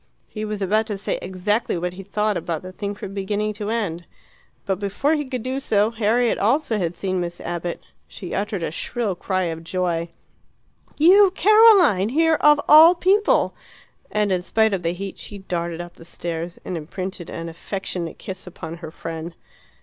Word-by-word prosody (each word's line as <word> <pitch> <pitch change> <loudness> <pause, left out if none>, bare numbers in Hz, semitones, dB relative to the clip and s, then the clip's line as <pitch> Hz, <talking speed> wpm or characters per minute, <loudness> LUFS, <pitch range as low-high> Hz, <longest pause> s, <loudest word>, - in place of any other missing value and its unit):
He 215 - -6
was 210 -1 -3
about 215 +3 +1
to 205 -3 -3
say 195 - -2
exactly 190 +3 -1
what 180 +1 -3
he 190 - -8
thought 210 +2 -1
about 170 -1 -3
the 185 - -8
thing 200 +2 -5
from 195 -1 -8
beginning 205 +2 -2
to 210 0 -5
end. 190 -7 -2 0.6
But 190 -2 -1
before 205 +9 0
he 295 -2 -1
could 255 -3 -4
do 260 +1 -2
so 215 -4 +2
Harriet 230 +2 +1
also 230 +1 +1
had 175 -2 -2
seen 185 -1 -2
Miss 175 0 -5
Abbott. 175 0 -4 0.2
She 180 - -8
uttered 200 -3 -2
a - - -2
shrill 220 +4 -2
cry 185 +1 -1
of 165 -1 -4
joy. 170 -1 -1 0.9
"You, 375 +5 +7
Caroline, 405 - +6
here 320 +4 +3
of 295 0 +6
all 320 +4 +9
people!" 395 +4 +3 0.6
And 210 -1 0
in 180 -1 +1
spite 220 +3 +2
of 190 - -1
the 170 0 -1
heat 195 +1 -7
she 205 - -8
darted 170 -3 -4
up 175 0 -9
the - - -13
stairs 170 0 -5
and 180 - -4
imprinted 175 +3 -6
an 165 0 -6
affectionate 170 0 -5
kiss 185 -1 -8
upon 165 -1 -8
her 165 -2 -8
friend. 165 +1 -7
195 Hz, 180 wpm, -22 LUFS, 175-220 Hz, 0.9 s, all